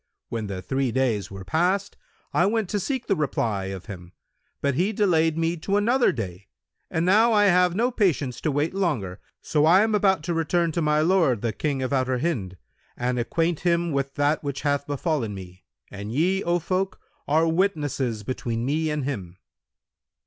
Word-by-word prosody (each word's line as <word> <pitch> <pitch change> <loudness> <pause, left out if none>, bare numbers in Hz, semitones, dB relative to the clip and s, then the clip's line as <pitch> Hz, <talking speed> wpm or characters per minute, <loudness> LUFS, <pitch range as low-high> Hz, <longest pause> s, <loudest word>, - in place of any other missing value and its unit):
When 110 -2 -3
the 95 -2 -5
three 135 -2 -1
days 115 -6 0
were 95 -1 -9
past, 185 - 0 0.4
I 175 - +3
went 220 -3 0
to 205 - 0
seek 255 +5 -2
the 195 - +1
reply 115 - -1
of 95 -1 -6
him, 90 -4 -10 0.5
but 140 0 0
he 180 +10 +1
delayed 165 -6 +2
me 165 +1 0
to 195 +5 0
another 240 +5 +3
day; 95 -5 -6 0.4
and 165 +1 0
now 220 +5 +5
I 205 -1 +5
have 180 -2 +4
no 240 +5 +1
patience 155 - 0
to 155 - 0
wait 145 +4 0
longer; 130 - -1 0.2
so 150 -1 +1
I 180 +5 +6
am 220 0 0
about 190 -5 +2
to 170 +2 -2
return 165 +1 +1
to 170 - -1
my 150 0 +2
lord, 160 - +2
the 115 -2 0
King 140 +2 -2
of 130 - -2
Outer 130 -1 +1
Hind, 120 - -2 0.4
and 125 0 -1
acquaint 165 +7 0
him 170 -1 +1
with 135 -1 -2
that 145 +2 +1
which 140 -2 -4
hath 145 -1 0
befallen 145 - -1
me; 90 -1 -11 0.3
and 100 +1 -6
ye, 180 +9 +1
O 175 0 +2
folk, 185 +3 -2 0.3
are 160 +3 +3
witnesses 145 - 0
between 115 0 -3
me 155 +4 0
and 150 -2 -2
him.' 95 -11 -5
150 Hz, 185 wpm, -25 LUFS, 120-180 Hz, 0.5 s, I